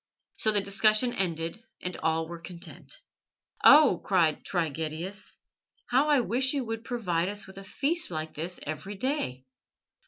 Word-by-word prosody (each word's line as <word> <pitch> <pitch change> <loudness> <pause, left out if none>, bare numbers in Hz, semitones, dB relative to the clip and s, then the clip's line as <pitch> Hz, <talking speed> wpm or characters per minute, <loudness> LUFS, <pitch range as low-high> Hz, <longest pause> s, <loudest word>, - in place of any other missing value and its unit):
So 220 - +4
the 205 -1 +4
discussion 215 +4 +3
ended, 170 +3 -1 0.2
and 180 0 -4
all 160 0 0
were 170 0 -8
content. 170 0 -7 0.6
"Oh," 290 - +7
cried 170 -6 +2
Trigetius, 165 +3 -3 0.5
"how 270 +5 +4
I 290 -4 +5
wish 255 +4 +2
you 270 -3 -1
would 225 0 -4
provide 185 -8 -1
us 205 0 -4
with 190 +1 -11
a - - -9
feast 300 - 0
like 155 -2 -4
this 170 +4 -5
every 155 +7 -5
day!" 190 - -2
190 Hz, 150 wpm, -28 LUFS, 165-235 Hz, 0.6 s, Oh